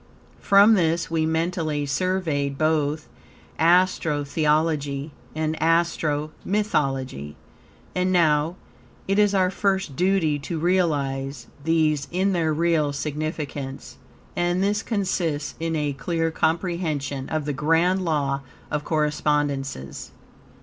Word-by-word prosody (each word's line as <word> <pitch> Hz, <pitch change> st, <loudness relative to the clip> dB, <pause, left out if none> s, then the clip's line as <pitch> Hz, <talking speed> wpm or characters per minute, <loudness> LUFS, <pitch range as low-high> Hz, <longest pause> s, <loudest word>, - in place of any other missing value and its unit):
From 200 Hz, +3 st, +6 dB
this 170 Hz, -4 st, +1 dB
we 160 Hz, -1 st, +1 dB
mentally 160 Hz, -2 st, -1 dB
surveyed 145 Hz, -3 st, -1 dB
both 155 Hz, 0 st, 0 dB, 0.5 s
Astro 170 Hz, -3 st, +3 dB
Theology 150 Hz, -1 st, 0 dB, 0.2 s
and 155 Hz, 0 st, -1 dB
Astro 160 Hz, -2 st, +1 dB
Mythology; 135 Hz, -, -1 dB, 0.6 s
and 185 Hz, 0 st, +1 dB
now, 160 Hz, -2 st, +3 dB, 0.5 s
it 195 Hz, +1 st, +2 dB
is 205 Hz, -1 st, +4 dB
our 185 Hz, -1 st, +3 dB
first 190 Hz, -6 st, 0 dB
duty 175 Hz, -4 st, +2 dB
to 160 Hz, +4 st, -4 dB
realize 140 Hz, -7 st, 0 dB, 0.2 s
these 155 Hz, -3 st, +1 dB
in 190 Hz, +2 st, +1 dB
their 165 Hz, -3 st, +1 dB
real 155 Hz, -2 st, +1 dB
significance, 145 Hz, -2 st, -4 dB, 0.4 s
and 175 Hz, +2 st, +1 dB
this 205 Hz, +2 st, +1 dB
consists 175 Hz, -9 st, -1 dB
in 165 Hz, 0 st, -1 dB
a 150 Hz, -2 st, -1 dB
clear 165 Hz, +4 st, -1 dB
comprehension 160 Hz, -5 st, -1 dB
of 155 Hz, -2 st, -2 dB
the 150 Hz, -, -1 dB
Grand 165 Hz, +6 st, +2 dB
Law 140 Hz, -5 st, 0 dB, 0.3 s
of 150 Hz, 0 st, -1 dB
Correspondences. 145 Hz, -, -1 dB
155 Hz, 110 wpm, -24 LUFS, 145-175 Hz, 0.6 s, From